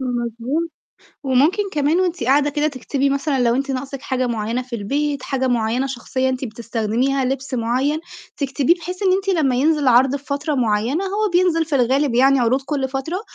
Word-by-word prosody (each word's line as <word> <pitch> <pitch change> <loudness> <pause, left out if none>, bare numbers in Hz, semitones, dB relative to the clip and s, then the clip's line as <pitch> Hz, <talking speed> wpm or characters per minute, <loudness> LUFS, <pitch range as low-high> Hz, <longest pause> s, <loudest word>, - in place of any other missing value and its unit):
مظبوط. 245 +6 -2 0.5
وممكن 285 +9 +2
كمان 300 +4 +2
وأنتِ 355 -9 -1
قاعدة 285 +3 +3
كده 295 +1 0
تكتبي 275 0 -1
مثلًا 275 -1 0
لو 235 -1 +3
أنتِ 275 +2 -1
ناقصِك 270 +1 -4
حاجة 255 -2 -1
معيّنة 230 +1 -2
في 250 -1 -6
البيت، 280 +6 -2
حاجة 265 -1 -1
معيّنة 240 +2 0
شخصيًا 260 0 -2
أنتِ 260 0 -2
بتستخدميها، 235 +3 -1
لبْس 270 +1 -3
معيّن، 255 +6 0 0.4
تكتبيه 280 +3 +1
بحيث 360 +2 -7
إن 380 -2 +3
أنتِ 390 +1 -1
لمّا 295 -9 +2
ينزل 295 0 +2
عَرْض 255 +3 +4
في 280 - -12
فترة 285 +2 -2
معيّنة، 240 - 0
هو 415 +2 0
بينزل 350 -2 +3
في 310 -2 -4
الغالب 265 +1 +2
يعني 265 +2 +4
عروض 250 +3 +2
كل 270 -1 -2
فترة، 280 +8 -3
270 Hz, 180 wpm, -20 LUFS, 250-295 Hz, 0.5 s, عَرْض